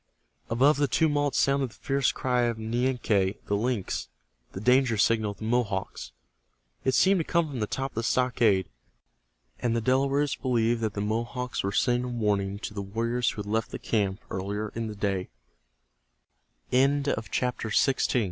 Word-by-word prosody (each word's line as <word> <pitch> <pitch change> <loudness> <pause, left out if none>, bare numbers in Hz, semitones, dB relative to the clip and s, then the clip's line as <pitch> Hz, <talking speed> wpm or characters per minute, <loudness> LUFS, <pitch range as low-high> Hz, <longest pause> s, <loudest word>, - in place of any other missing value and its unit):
Above 135 +6 +4
the 145 0 +2
tumult 145 -2 +1
sounded 140 -1 +2
the 105 - -18
fierce 135 +2 0
cry 125 -1 0
of 115 -1 -2
Nianque, 110 -4 0
the 100 - 0
lynx, 110 -2 -2 0.4
the - - -6
danger 125 +1 +3
signal 110 0 +2
of 100 - -7
the - - -9
Mohawks. 110 -4 -2 0.7
It 130 - +2
seemed 190 0 +4
to - - +1
come 170 0 +1
from 135 -4 -5
the 105 - -1
top 135 +4 -3
of - - -30
the - - +1
stockade, 115 -5 +2 0.9
and 120 -1 0
the - - +2
Delawares 135 +4 +1
believed 120 -2 +1
that 110 -2 -2
the 100 - -2
Mohawks 120 +4 -2
were 100 - -2
sending 120 +4 +1
a - - -3
warning 105 -5 -1
to 105 - -6
the 100 - -4
warriors 115 +4 -1
who 105 - -5
had 100 - -7
left 115 +1 0
the - - -5
camp 100 -3 -1
earlie 100 0 -3
115 Hz, 155 wpm, -27 LUFS, 105-130 Hz, 0.9 s, Above